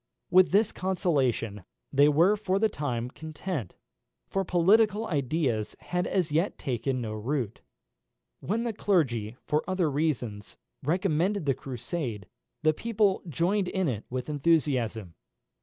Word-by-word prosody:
With 185 0 +6
this 205 +3 +3
consolation 135 - 0 0.3
they 145 +2 +6
were 170 +8 +4
for 200 -2 0
the 220 +2 +3
time 125 - -3
content, 155 - -5 0.5
for 195 - -1
political 205 +5 +3
ideas 140 - -1
had 180 0 -2
as 180 -5 0
yet 165 +6 +1
taken 130 -1 -2
no 110 -2 -4
root. 115 +1 -3 0.8
When 225 +4 -1
the 235 -2 -2
clergy, 125 - 0
for 150 +1 +1
other 185 -5 +1
reasons, 125 -9 -2 0.2
recommended 180 +3 +1
the 135 - +3
Crusade, 125 - -5 0.4
the 155 0 +4
people 210 0 +1
joined 180 +7 +1
in 190 -1 0
it 110 -6 -2
with 125 0 -4
enthusiasm. 135 - +1
155 Hz, 130 wpm, -28 LUFS, 125-185 Hz, 0.8 s, With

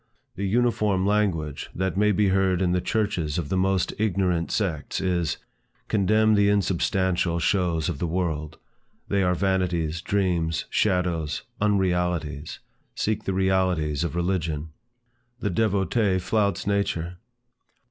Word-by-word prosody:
The 100 +2 -2
uniform 105 -3 +1
language 95 -8 0
that 95 +1 -1
may 105 +2 +3
be 105 0 +2
heard 95 -1 +2
in 90 -2 +1
the 90 0 +1
churches 100 -10 -1
of 80 -5 -3
the - - 0
most 95 -1 +1
ignorant 90 -5 +1
sects, 85 -9 -2
is, 90 -4 0 0.5
"Contemn 110 +2 +3
the 100 -1 +4
unsubstantial 95 -3 +1
shows 85 -2 +1
of 85 -6 -3
the 85 - -1
world; 80 -3 -2 0.5
they 100 -1 +2
are 90 -1 +2
vanities, 90 -4 0
dreams, 90 -6 0
shadows, 90 -6 0 0.2
unrealities; 90 -7 0 0.4
seek 110 0 -1
the 95 - -1
realities 95 -5 +1
of 85 -2 -3
religion." 85 -4 -1 0.7
The 105 -4 -1
devotee 100 0 +1
flouts 100 +1 0
nature. 90 -4 -1
95 Hz, 125 wpm, -25 LUFS, 85-100 Hz, 0.7 s, the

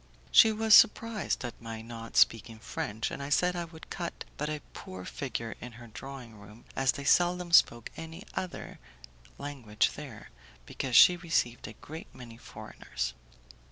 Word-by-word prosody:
She 220 - +8
was 220 0 +2
surprised 210 - +4
at 120 - -8
my 115 -1 -7
not 115 0 -8
speaking 115 0 +3
French, 110 0 -4
and 140 +1 -6
said 180 +4 +2
I 175 -1 -3
would 160 -1 -14
cut 170 -2 -5
but 150 +1 -3
a 150 -1 -4
poor 95 -1 -9
figure 115 -4 -4
in 125 -1 -8
her 120 +1 -12
drawing 120 -1 -10
room, 105 +3 -15
as 135 -1 +2
they 140 - -7
seldom 175 +4 +2
spoke 120 -8 +4
any 165 +3 -8
other 185 -2 -6 0.6
language 125 -7 -1
there, - - -10 0.3
because 125 - -3
she 180 +8 +8
received 160 -9 -1
a - - -9
great 160 +2 -10
many 115 -2 -11
foreigners. - - -6
135 Hz, 160 wpm, -30 LUFS, 115-170 Hz, 0.6 s, She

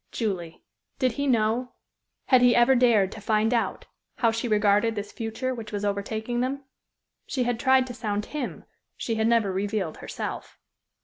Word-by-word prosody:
Julie! 180 -7 -3 0.3
Did 255 -1 +2
he 280 +5 -2
know 235 0 +1 0.5
had 255 -2 +5
he 245 -1 +5
ever 240 +2 +5
dared 235 -6 +4
to 220 - -9
find 215 +2 +1
out 235 - -1 0.3
how 230 -2 +2
she 230 +2 -2
regarded 210 +1 +3
this 205 0 -5
future 240 +3 -3
which 225 -3 -7
was 205 -1 -3
overtaking 220 +4 -2
them? 275 +2 -2 0.6
She 255 - -1
had 240 -1 -1
tried 260 0 +4
to 250 - -7
sound 210 -2 -3
him; 295 -4 -5 0.3
she 230 - -2
had 220 0 +1
never 230 -4 +3
revealed 195 -3 -2
herself. - - -6
225 Hz, 170 wpm, -26 LUFS, 210-245 Hz, 0.6 s, had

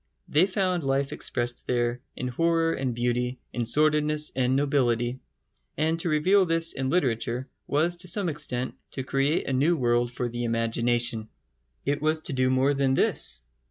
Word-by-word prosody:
They 160 +6 +3
found 185 -3 0
life 135 0 0
expressed 120 -1 -3
there 120 0 0
in 125 - -4
horror 165 +5 +1
and 130 -3 -2
beauty, 125 +1 -1 0.2
in 120 -2 -2
sordidness 150 +2 +2
and 130 0 +1
nobility, 130 -3 +1 0.6
and 160 +3 0
to 170 - 0
reveal 185 +6 +4
this 165 0 +4
in 130 0 -2
literature 125 -5 0 0.2
was 165 +4 +1
to 180 +1 -5
some 190 +2 +1
extent 130 -5 -3 0.2
to 135 - -3
create 135 +4 0
a 135 - -1
new 155 +6 +2
world 120 -2 +1
for 125 0 -3
the 120 0 -4
imagination. 115 -1 +1 0.6
It 145 +1 -1
was 155 +1 +1
to 150 - -2
do 130 -1 +1
more 130 +2 +2
than 135 -1 +1
this. 65 - +1
135 Hz, 165 wpm, -26 LUFS, 120-155 Hz, 0.6 s, reveal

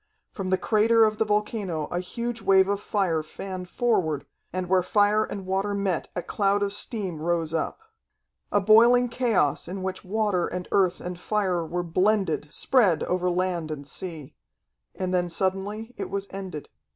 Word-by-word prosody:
From 190 -2 -4
the 185 - +3
crater 225 +2 +4
of 215 0 -1
the 220 - +3
volcano 210 -6 -1
a 175 - -1
huge 235 +5 -4
wave 190 -1 +5
of 200 0 -1
fire 185 -8 0
fanned 180 +3 -7
forward, 180 - 0 0.3
and 185 0 -3
where 185 0 +3
fire 205 +3 +3
and 195 -2 -6
water 195 +2 -1
met 195 -4 -1
a 175 - -2
cloud 200 0 +1
of 200 0 -1
steam 195 -6 -1
rose 165 -1 0
up. 160 - -2 0.7
A 205 - +4
boiling 235 +4 +6
chaos 225 - +1
in 185 +1 -5
which 190 0 -4
water 205 -2 0
and 180 0 -5
earth 185 -3 +2
and 180 0 -6
fire 185 -4 0
were 175 +2 -3
blended, 180 -4 +1
spread 205 - +2
over 180 0 0
land 180 -2 -1
and 145 -2 -6
sea. 160 -5 -6 0.6
And 185 -1 -2
then 175 -1 +1
suddenly 195 +6 -2
it - - -3
was 200 0 -3
ended. 190 -6 -7
190 Hz, 170 wpm, -26 LUFS, 175-210 Hz, 0.7 s, boiling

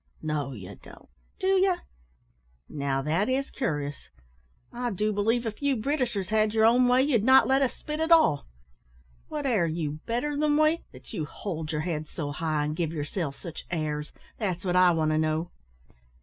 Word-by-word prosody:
"No, 150 -3 -2
you 100 -4 -9
don't, - - -15 0.3
do 380 - -3
you? 380 -1 +4 0.9
Now, 140 -2 -2
that 165 - +1
is 270 +1 -1
cur'ous. 145 - -3 0.6
I 245 0 -2
do 210 +1 -1
believe 225 +4 +1
if 220 +2 -5
you 280 -1 +2
Britishers 240 - -1
had 215 0 +2
your 220 0 +5
own 245 +2 +5
way, 250 +1 +4
you'd 255 -7 +2
not 260 +2 +7
let 270 +1 +3
us 265 - +1
spit 300 0 -5
at 320 +1 0
all. 315 - +5 0.8
What 300 -2 -4
air 215 -10 +2
you 155 -2 -3
better 245 +6 -1
than 295 0 +2
we, 310 +2 +3
that 130 -1 -13
you 155 - -2
hold 160 -2 -5
your 150 -1 -1
heads 155 -2 -3
so 145 -3 -4
high, 155 -1 -1
and 150 +1 -2
give 165 -2 -1
yourselves 150 -1 -3
sich 165 -4 -8
airs! 150 -3 -3 0.3
that's 190 -4 -2
what 180 -1 0
I 180 0 +6
want 160 -2 +1
to 155 - +2
know." 155 +2 -1
185 Hz, 185 wpm, -27 LUFS, 155-255 Hz, 0.9 s, not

